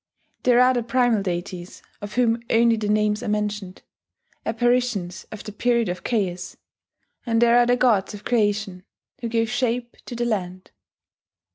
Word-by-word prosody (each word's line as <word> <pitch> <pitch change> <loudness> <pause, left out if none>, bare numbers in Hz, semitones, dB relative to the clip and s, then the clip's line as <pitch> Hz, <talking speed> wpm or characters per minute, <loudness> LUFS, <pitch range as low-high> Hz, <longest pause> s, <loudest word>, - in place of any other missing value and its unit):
There 245 -1 +4
are 250 +1 +5
the 245 - 0
primal 240 -2 +2
deities, 180 -1 -5 0.2
of 205 +1 -7
whom 235 -1 +2
only 230 0 +4
the 215 -2 -3
names 210 0 +1
are - - -5
mentioned, 210 -2 -3 0.6
apparitions 230 -6 0
of 215 - -8
the 210 - -7
period 235 0 +1
of 180 0 -5
chaos; 185 -6 -2 0.7
and 230 -2 +1
there 235 0 +5
are 240 0 +5
the 245 0 +3
gods 220 -5 +2
of 205 - -12
creation, 205 -5 0 0.4
who 235 - -4
gave 230 0 +1
shape 245 -1 -1
to 245 - -6
the 240 0 -1
land. 185 -5 -3
225 Hz, 160 wpm, -23 LUFS, 200-240 Hz, 0.7 s, are